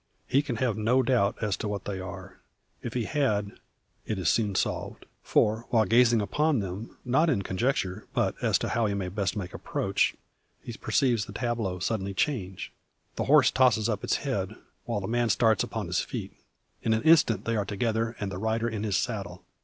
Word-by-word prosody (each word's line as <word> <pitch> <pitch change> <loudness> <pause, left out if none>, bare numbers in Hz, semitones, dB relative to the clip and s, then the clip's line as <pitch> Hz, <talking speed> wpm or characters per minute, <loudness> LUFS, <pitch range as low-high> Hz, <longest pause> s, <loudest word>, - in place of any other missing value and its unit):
He 140 - +3
can 145 -5 -4
have 115 -2 0
no 125 +5 +3
doubt 115 -5 +2
as 105 -3 +1
to - - -3
what 105 -1 -4
they 100 -2 -3
are. 95 - -8 0.4
If 120 - -6
he 120 - 0
had, 105 -6 0 0.5
it 110 - -3
is 90 -4 +1
soon 105 -4 +1
solved. - - -2 0.2
For 110 +2 +1
while 115 -3 +4
yet 105 - -8
gazing 120 -2 +5
upon 150 +7 +1
them 100 +2 -5
not 145 +7 +3
in 100 - +1
conjecture, 95 -1 -1
but - - +2
as - - +3
to - - -3
how 115 -2 +1
he 100 - -1
may 95 -2 -2
best 95 -1 -2
make 90 -3 -5
approach - - 0 0.5
he 120 - -6
perceives 110 -1 +1
the - - -10
tableau 115 -6 -2
suddenly 100 +1 -2
change. 95 -9 -2 0.4
The - - -2
horse 145 -2 +6
tosses 120 -4 +3
up 105 -4 -2
its - - +1
head, 110 -6 -2 0.3
while 115 -4 -2
the 95 - -4
man 120 0 +1
starts 110 0 +3
upon - - -4
his - - 0
feet. - - -5 0.5
In 110 - +1
an 110 - 0
instant 150 - +4
they 115 - 0
are 105 - +1
together, 115 +3 -1
and 100 -1 -3
the 90 - -5
rider 110 +2 0
in 110 -3 -3
his 105 -3 0
saddle. 100 -7 -3
110 Hz, 200 wpm, -28 LUFS, 100-120 Hz, 0.5 s, horse